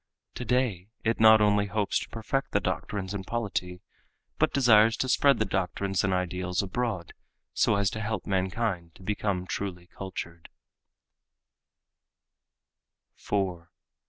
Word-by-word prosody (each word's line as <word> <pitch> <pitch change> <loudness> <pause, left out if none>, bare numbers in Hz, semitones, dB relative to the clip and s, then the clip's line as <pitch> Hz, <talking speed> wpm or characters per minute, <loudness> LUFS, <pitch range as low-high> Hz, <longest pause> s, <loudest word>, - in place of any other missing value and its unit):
Today 125 -7 -1
it 115 +1 0
not 110 -1 +8
only 105 -1 +3
hopes 100 0 0
to - - -8
perfect 135 +5 -3
the 100 - +4
doctrines 95 0 -3
and 100 -2 -4
polity, 95 -5 -3 0.6
but - - +3
desires 115 -4 +5
to 130 - -1
spread 140 +2 +4
the 110 - +1
doctrines 95 0 -1
and 95 - +1
ideals 90 0 -1
abroad 100 -3 -3 0.4
so - - +3
as 100 -1 +1
to 110 - -5
help 110 +1 -3
mankind 95 -2 -1
to - - -15
become 100 -2 -1
truly 90 -2 -4
cultured." 85 -2 -8
100 Hz, 125 wpm, -28 LUFS, 95-110 Hz, 0.6 s, not